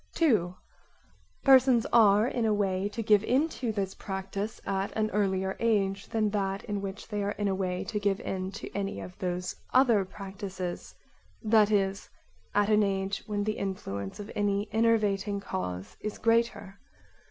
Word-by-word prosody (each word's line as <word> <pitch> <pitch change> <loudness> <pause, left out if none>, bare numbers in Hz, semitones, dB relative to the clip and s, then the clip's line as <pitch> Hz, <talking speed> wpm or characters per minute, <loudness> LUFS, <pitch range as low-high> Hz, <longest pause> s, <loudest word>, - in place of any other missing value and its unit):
2) 210 - +2 0.9
Persons 260 -3 +6
[are] 215 -1 +6
in 245 -2 -1
a 220 -1 +3
way 195 -1 0
to 225 +2 -4
give 210 -1 +4
into 260 -1 0
this 195 -3 -2
practise 195 +2 -5
at 195 0 -1
an 215 0 0
earlier 190 -2 0
age 195 -4 +1
than 215 -2 +1
that 195 0 -1
in 205 -2 -3
which 195 +1 -6
they 210 -2 -3
are 200 +1 -1
in 205 - -2
a 195 - +1
way 185 -1 -2
to 210 - -3
give 200 -1 +1
in 185 0 -3
to 215 - -7
any 200 0 -2
of 180 - -8
those 180 0 -3 0.2
other 240 -6 +5
practises, 190 -2 -6 0.5
that 215 -1 +5
is, 195 -2 0 0.5
at 205 0 +4
an 215 0 +5
age 195 -1 -1
when 205 -1 -1
the 215 +1 -2
influence 100 - -4
of 205 +1 -7
any 205 0 0
enervating 210 -3 +2
cause 100 - -5
is 215 - -5
greater. 230 -4 0
200 Hz, 165 wpm, -29 LUFS, 195-215 Hz, 0.9 s, Persons